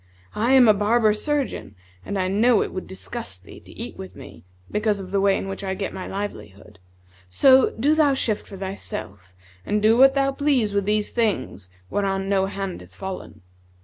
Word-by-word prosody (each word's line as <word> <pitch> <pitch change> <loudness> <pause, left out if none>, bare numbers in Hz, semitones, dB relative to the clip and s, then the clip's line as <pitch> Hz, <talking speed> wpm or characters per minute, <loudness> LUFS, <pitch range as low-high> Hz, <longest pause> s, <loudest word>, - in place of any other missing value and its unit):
I 235 +5 +1
am 260 -3 +7
a 215 - +7
barber 215 +2 +3
surgeon, 280 - -3 0.3
and 200 - -4
I 185 -1 0
know 215 +4 +3
it - - -7
would 185 - -5
disgust 190 - -8
thee - - -13
to - - -16
eat - - -8
with 95 0 -9
me' 80 -5 -12 0.3
because 210 -1 0
of 185 -1 -8
the 200 -1 +1
way 195 0 +3
in - - -5
which 195 +1 -6
I 190 -1 -2
get 195 - -4
my 185 - -6
livelihood;[FN#150] 100 - -9 0.2
so 260 - +5
do 290 +6 +3
thou 300 -3 +3
shift 220 -5 -1
for 195 - -10
thyself 190 - -7 0.3
and 210 - 0
do 215 +2 +4
what 270 +1 +7
thou 275 0 +2
please 270 -7 +1
with 200 -1 0
these 210 0 0
things 205 - -1 0.2
whereon 195 -1 -1
no 195 -1 +1
hand 195 -2 -5
hath - - -16
fallen.' 190 - -7
200 Hz, 195 wpm, -23 LUFS, 190-230 Hz, 0.3 s, am